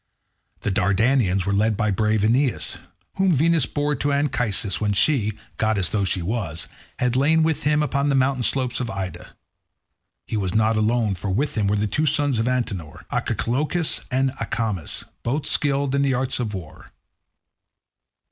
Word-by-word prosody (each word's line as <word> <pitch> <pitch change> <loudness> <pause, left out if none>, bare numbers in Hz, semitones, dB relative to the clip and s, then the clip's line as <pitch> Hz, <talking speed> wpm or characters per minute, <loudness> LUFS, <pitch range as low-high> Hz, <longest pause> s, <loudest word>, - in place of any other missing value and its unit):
The 105 - -1
Dardanians 100 0 +2
were 100 - 0
led 105 +1 +2
by 105 -2 +1
brave 110 +1 +1
Aeneas, 125 +4 +1 0.4
whom 190 -2 +3
Venus 160 0 +2
bore 145 0 -1
to 145 - 0
Anchises, 120 -9 0
when 105 -1 +1
she, 110 -1 +3 0.2
goddess 110 -5 +1
though 100 -2 0
she 90 -1 0
was, 90 -5 -3 0.3
had 125 -1 0
lain 155 +4 +3
with 155 -2 0
him 150 0 +3
upon 140 -1 0
the 140 - +2
mountain 130 0 +2
slopes 125 0 +1
of 125 -3 -3
Ida. 95 -3 -6 0.9
He 110 - -3
was 95 -2 -2
not 110 +1 +3
alone, 110 0 +1
for 95 +2 -5
with 130 +11 0
him 105 -3 +1
were 100 - +2
the 105 +1 +1
two 150 +10 0
sons 145 -5 +1
of 115 - 0
Antenor, 110 - -3
Archelochus 150 +7 0
and 130 +1 +1
Acamas, 110 -6 -3 0.2
both 140 +5 -2
skilled 140 -2 0
in 140 - +2
all 140 - +2
the 135 - +2
arts 130 +1 0
of 110 -4 -2
war. 85 -5 -10
120 Hz, 170 wpm, -23 LUFS, 105-140 Hz, 0.9 s, whom